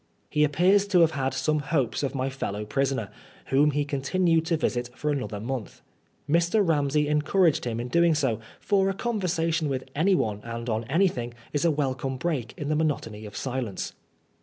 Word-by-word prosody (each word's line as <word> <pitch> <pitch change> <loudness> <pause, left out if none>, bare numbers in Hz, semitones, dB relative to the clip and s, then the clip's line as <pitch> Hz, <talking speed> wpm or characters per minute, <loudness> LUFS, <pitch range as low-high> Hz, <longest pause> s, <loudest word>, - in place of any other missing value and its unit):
He 150 - +3
appears 180 +7 +3
to 185 -4 +4
have 165 -1 +5
had 135 -3 -1
some 150 +3 0
hopes 140 -4 0
of 140 -1 -2
my 130 0 0
fellow 105 -5 -4
prisoner, 135 -3 -1 0.4
whom 145 +3 +4
he 145 0 0
continued 165 +4 +1
to 165 -2 +2
visit 120 -5 -1
for 150 - -1
another 125 -7 -3
month. 120 0 -5 0.4
Mr. 170 +6 +3
Ramsey 150 -1 +2
encouraged 150 +2 +2
him 115 -1 -2
in 120 - -3
doing 170 +4 +3
so, 135 -8 0 0.2
for 195 -2 +2
a 195 - -2
conversation 170 -8 0
with 130 -1 -2
anyone 150 - +1
and 115 0 -6
on 110 +1 -1
anything 125 - 0 0.2
is 145 +3 +1
a - - +5
wel 145 -4 0
come 130 0 -4
break 130 -7 -2
in 145 - -4
the 155 - +1
monotony 115 -9 -2
of 105 0 -9
silence. 125 -7 -3
145 Hz, 185 wpm, -26 LUFS, 125-165 Hz, 0.4 s, have